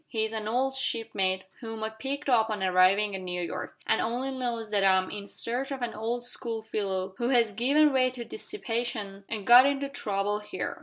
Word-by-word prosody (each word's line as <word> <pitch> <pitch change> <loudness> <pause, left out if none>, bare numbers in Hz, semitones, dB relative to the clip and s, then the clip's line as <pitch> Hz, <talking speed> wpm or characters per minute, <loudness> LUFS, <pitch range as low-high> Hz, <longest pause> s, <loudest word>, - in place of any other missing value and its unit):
"He 220 -3 -1
is 220 0 -2
an 215 -1 -3
old 260 +4 0
shipmate 195 -7 0 0.2
whom 225 -2 -6
I 220 - -2
picked 270 +7 -4
up 225 -4 +3
on 210 -3 -2
arriving 190 +3 +4
at 190 - -4
New 180 -1 -4
York, 175 - -5
and 220 - +2
only 250 +4 -1
knows 240 -4 -3
that 205 -2 +2
I 190 -1 +6
am 185 0 -1
in 205 -1 -6
search 250 +4 -2
of 265 -2 -4
an 235 - -2
old 235 +3 -3
school 230 -2 -2
fellow 195 -3 -3
who 240 0 0
has 235 -4 +3
given 280 +7 +4
way 255 -1 +4
to 250 -2 -7
dissipation 230 - -4
and 215 -3 -4
got 245 +4 +9
into 280 0 -1
trouble 205 -5 -1
here. 210 - -5
225 Hz, 210 wpm, -28 LUFS, 200-250 Hz, 0.2 s, got